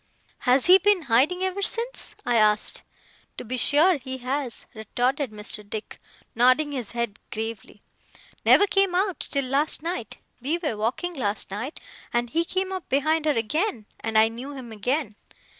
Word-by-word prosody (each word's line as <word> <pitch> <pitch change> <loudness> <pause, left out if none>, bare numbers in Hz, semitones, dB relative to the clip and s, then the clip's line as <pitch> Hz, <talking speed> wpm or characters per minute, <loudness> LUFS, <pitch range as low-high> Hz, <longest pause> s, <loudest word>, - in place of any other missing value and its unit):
'HAS 255 +1 +4
he 370 +2 +8
been 400 -2 +3
hiding 285 +9 +2
ever 375 +1 -2
since?' 465 +4 -1
I 240 - +1
asked. 215 -1 +4 0.6
'To - - -7
be 250 +3 -3
sure 305 +7 +3
he 260 -1 -6
has,' 260 0 -3
retorted 250 +5 -1
Mr. 210 0 -3
Dick, 215 0 -7 0.3
nodding 255 +6 +3
his 250 -7 -4
head 235 -3 -3
gravely. 220 -2 -6 0.6
'Never 405 - +6
came 390 -2 +2
out, 380 0 0
till 275 -2 -2
last 280 +4 +1
night! 330 - -4 0.2
We 295 +7 0
were 310 -10 -3
walking 245 +12 -2
last 210 - 0
night, 235 +10 -5 0.3
and 240 0 -1
he 335 +4 +2
came 375 +2 0
up 375 -2 -6
behind 310 +3 +1
her 300 -5 +2
again, 235 - -1
and 225 -1 -1
I 220 0 +6
knew 245 +5 -7
him 250 -4 -9
again. 225 +1 -2
260 Hz, 165 wpm, -25 LUFS, 230-330 Hz, 0.6 s, he